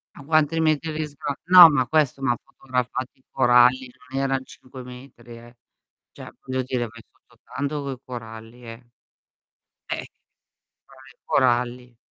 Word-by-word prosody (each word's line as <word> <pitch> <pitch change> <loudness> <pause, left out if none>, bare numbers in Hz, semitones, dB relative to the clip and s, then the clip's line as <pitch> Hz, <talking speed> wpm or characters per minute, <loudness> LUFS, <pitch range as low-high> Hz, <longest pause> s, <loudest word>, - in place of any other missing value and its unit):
A 145 - -12
quanti 155 +1 +2
metri 155 0 0
di 155 0 -3
sgra 145 0 -5
no, 180 -2 +10
ma 135 -5 0
questo 150 -3 +1
ma 135 -2 +1
ha - - -7
fotografato 125 -1 -4
i 130 - -34
coralli, 125 0 +4 0.2
non 135 +1 -3
eran 135 -1 -1
5 130 0 -13
metri, 125 -2 -13
eh. 120 +1 -16 0.6
Cioè, - - -12
voglio 130 0 -2
dire, 125 -1 -3
vai 115 +1 -14
sotto - - -30
tanto 145 +1 -4
coi 135 -2 -5
coralli, 115 0 -10
eh. 115 +1 -12 1.0
Eh. - - -4 1.0
Cioè, - - -16
i - - -46
coralli. 125 -1 0
130 Hz, 155 wpm, -23 LUFS, 120-140 Hz, 1.0 s, no